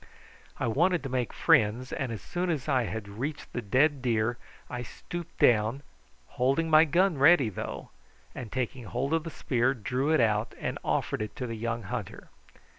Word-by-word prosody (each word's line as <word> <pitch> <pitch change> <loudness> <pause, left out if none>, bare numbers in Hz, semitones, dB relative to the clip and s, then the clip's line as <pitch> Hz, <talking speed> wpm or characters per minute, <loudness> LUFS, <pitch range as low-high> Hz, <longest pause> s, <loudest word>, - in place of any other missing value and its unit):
I - - -1
wanted 170 +9 +2
to 135 - -4
make 125 -2 -1
friends, 115 +4 +2
and 135 -4 -2
as 110 -5 -6
soon 180 +1 -2
as 155 -5 -2
I 130 -4 +2 0.2
reached 130 +9 -5
the 120 - -2
dead 135 +7 +2
deer 120 -1 0 0.3
I 125 -1 -5
stooped 175 +7 -8
down, 115 +4 +3 0.6
holding 140 +6 +2
my 155 +1 +8
gun 170 0 +2
ready 140 -4 +6
though, 100 - -6 0.4
and 120 -4 -7
taking 125 -1 -3
hold 130 +7 -2
of 165 0 +1
the - - -3
spear, 130 -3 0
drew 125 +5 -1
it 160 - +4
out 110 -2 +1
and - - -3
offered - - -1
it 105 - -5
to 135 -4 -4
the 115 - -4
young 115 +1 -3
hunter. 95 - -6
130 Hz, 180 wpm, -28 LUFS, 115-150 Hz, 0.6 s, my